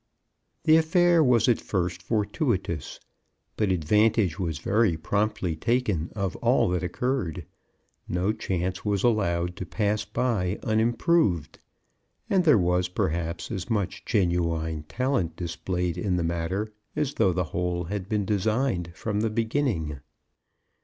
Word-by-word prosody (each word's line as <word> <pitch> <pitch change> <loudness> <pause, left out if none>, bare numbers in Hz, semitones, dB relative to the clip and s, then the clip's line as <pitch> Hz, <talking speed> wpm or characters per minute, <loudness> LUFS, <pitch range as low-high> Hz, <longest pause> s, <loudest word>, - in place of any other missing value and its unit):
The 155 0 +6
affair 170 +1 +4
was 120 -5 +4
at 120 - +3
first 90 -2 -2
fortuitous, 105 - -1 0.6
but 105 -3 +1
advantage 100 +1 +2
was 85 -5 -2
very 100 +1 +2
promptly 100 0 -1
taken 105 -4 0
of 100 -4 -2
all - - +3
that 90 0 0
occurred; 90 - -2 0.6
no 90 +4 0
chance 95 -2 -3
was 100 -2 0
allowed 90 -7 +1
to 95 - -4
pass 105 +2 0
by 105 -3 -1
unimproved; 110 - +1 0.7
and 190 -3 +3
there 150 -7 +6
was, 90 -1 +2
perhaps, 85 -2 -2
as 95 -1 -4
much 100 -5 -1
genuine 85 -5 0
talent 125 -10 0
displayed 90 +1 -3
in 90 0 0
the 90 - 0
matter 85 +6 -2 0.2
as 150 -2 -1
though 95 - +3
the 90 +1 0
whole 90 0 -1
had 95 +2 -5
been 105 -2 0
designed 105 -2 0
from 105 0 -2
the 110 - +1
beginning. 110 - -1
95 Hz, 130 wpm, -26 LUFS, 85-115 Hz, 0.7 s, The